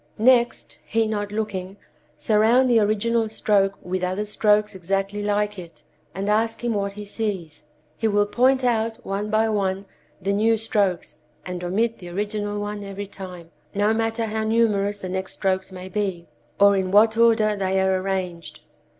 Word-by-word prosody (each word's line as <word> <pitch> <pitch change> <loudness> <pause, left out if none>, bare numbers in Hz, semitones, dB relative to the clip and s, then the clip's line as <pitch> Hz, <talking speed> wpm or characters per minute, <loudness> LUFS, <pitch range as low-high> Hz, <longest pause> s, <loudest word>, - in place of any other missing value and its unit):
Next, 240 +1 +2
he 225 0 0
not 205 -1 -3
looking, 200 -3 -4 0.4
surround 225 +4 +3
the 230 - +5
original 220 +2 +1
stroke 200 -2 +1
with 185 +1 -3
other 185 +3 -1
strokes 210 0 +2
exactly 195 +2 -2
like 205 0 -1
it, 170 -2 -12 0.3
and 195 +2 -3
ask 225 +2 0
him 240 -1 0
what 200 -1 -2
he 210 +1 -8
sees. 195 -8 -5 0.3
He 225 - 0
will 205 -1 +3
point 260 +5 +2
out 225 -2 +1
one 200 +2 -3
by 220 +1 +2
one 195 -2 -1 0.3
the 200 +1 -1
new 225 +2 +3
strokes 200 -8 -1 0.3
and 180 -1 -5
omit 220 +6 0
the 175 - -9
original 205 +2 -3
one 205 0 -4
every 200 0 -6
time, 180 -4 -10 0.2
no 205 +2 +2
matter 225 +1 -1
how 220 0 -2
numerous 215 -2 +1
the 190 - -6
next 190 0 -3
strokes 190 -1 -1
may 185 0 -8
be, 190 -3 -3 0.3
or 200 0 +6
in 190 -1 0
what 215 +3 +5
order 225 -2 +4
they 190 -1 0
are 190 -1 +2
arranged. 185 -3 -4
205 Hz, 165 wpm, -23 LUFS, 190-220 Hz, 0.4 s, or